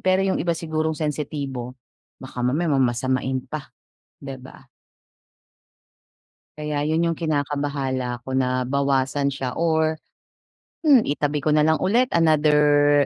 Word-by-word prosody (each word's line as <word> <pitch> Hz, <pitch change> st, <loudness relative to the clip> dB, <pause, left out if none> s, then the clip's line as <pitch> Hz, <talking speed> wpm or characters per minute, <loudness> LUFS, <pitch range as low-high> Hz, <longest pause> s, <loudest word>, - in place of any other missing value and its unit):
pero 185 Hz, +1 st, +2 dB
'yong 190 Hz, -, 0 dB
iba 170 Hz, -1 st, 0 dB
sigurong 160 Hz, -2 st, -2 dB
sensitibo, 140 Hz, -4 st, -4 dB, 0.4 s
baka 130 Hz, -1 st, -8 dB
mamaya 150 Hz, +6 st, 0 dB
mamasamain 130 Hz, 0 st, 0 dB
pa, 145 Hz, +1 st, -7 dB, 0.5 s
'di 135 Hz, -1 st, -7 dB
ba? 135 Hz, 0 st, -14 dB, 1.9 s
Kaya 150 Hz, -1 st, -2 dB
'yon 160 Hz, +2 st, +1 dB
'yong 165 Hz, -1 st, 0 dB
kinakabahala 140 Hz, -5 st, -2 dB
ko 130 Hz, -, -11 dB
na, 130 Hz, -1 st, +1 dB
bawasan 140 Hz, +1 st, 0 dB
siya 130 Hz, -2 st, -4 dB
or, 160 Hz, -1 st, +1 dB, 0.9 s
hmm, 275 Hz, -6 st, +7 dB
itabi 145 Hz, -1 st, -1 dB
ko 155 Hz, -, 0 dB
na 150 Hz, 0 st, +4 dB
lang 160 Hz, 0 st, +2 dB
ulit 235 Hz, +7 st, +3 dB
another, 150 Hz, -3 st, +4 dB
145 Hz, 125 wpm, -23 LUFS, 130-155 Hz, 1.9 s, hmm